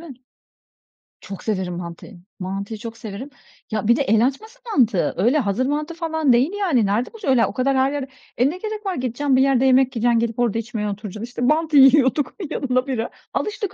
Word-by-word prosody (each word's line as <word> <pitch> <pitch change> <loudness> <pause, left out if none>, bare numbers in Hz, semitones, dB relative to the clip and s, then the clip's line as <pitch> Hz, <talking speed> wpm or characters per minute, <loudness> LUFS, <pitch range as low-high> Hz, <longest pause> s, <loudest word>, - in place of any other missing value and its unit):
mi? 330 -6 -10 1.1
Çok 195 - -9
severim 185 -5 -2
mantıyı. 175 +3 -9 0.2
Mantıyı 195 +4 -5
çok 230 +1 -8
severim. 225 +4 -7 0.4
Ya 215 -1 -2
bir 235 - +5
de - - -1
el 225 -2 +3
açması 440 - -4
mantı, 230 - +2
öyle 245 +11 +3
hazır 225 +2 0
mantı 300 +4 -2
falan 320 -4 +1
değil 255 +9 +3
yani. 285 - +2
Nerede 210 +5 +1
bulacaksın? 435 -9 -5
Öyle 255 -3 +4
o - - -5
kadar 265 +1 +1
her 265 +1 +2
yerde 285 -2 -3 0.3
E, 250 +3 +3
ne 340 - -5
gerek 430 +2 -6
var 380 -2 -1
gideceksin, 255 +2 0
bir 260 - +4
yerde 265 -1 +3
yemek 260 0 +3
yiyeceksin, 235 0 +2
gidip 230 0 -2
orada 235 -3 +1
içmeye 225 -2 -4
oturacaksın. 205 +1 -6
İşte 245 0 -8
mantı 305 +4 +2
yiyorduk, 270 0 +5 0.2
yanına 255 0 -1
bira. 235 -4 -2 0.2
Alıştık 420 -2 -3
255 Hz, 195 wpm, -21 LUFS, 225-290 Hz, 1.1 s, bir